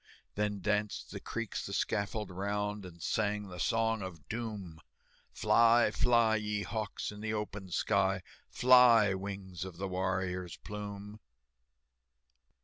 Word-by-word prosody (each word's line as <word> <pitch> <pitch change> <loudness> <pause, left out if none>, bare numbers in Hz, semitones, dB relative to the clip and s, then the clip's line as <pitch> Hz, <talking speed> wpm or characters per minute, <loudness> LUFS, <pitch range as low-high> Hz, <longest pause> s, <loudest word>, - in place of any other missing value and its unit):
Then 105 -1 -1
danced 105 +1 -1
the - - -5
Creeks 115 -2 -4
the - - -6
scaffold 105 0 -1
round, 105 +1 -2
And 85 -2 -12
sang 105 -2 0
the 90 -1 -8
Song 115 +3 +1
of 90 -5 -8
Doom, 105 -8 -5 0.5
"Fly, 115 +1 +4
fly, 115 -2 +3
ye 105 -1 -2
hawks, 105 +1 -3
in 105 0 -10
the 110 0 -2
open 100 -2 -5
sky, 95 0 +1 0.3
Fly, 120 -5 +6
wings 95 -2 -5
of 95 -3 -8
the 95 +2 -3
warrior's 90 -1 -2
plume!" 105 0 -7
105 Hz, 130 wpm, -32 LUFS, 95-110 Hz, 0.5 s, Fly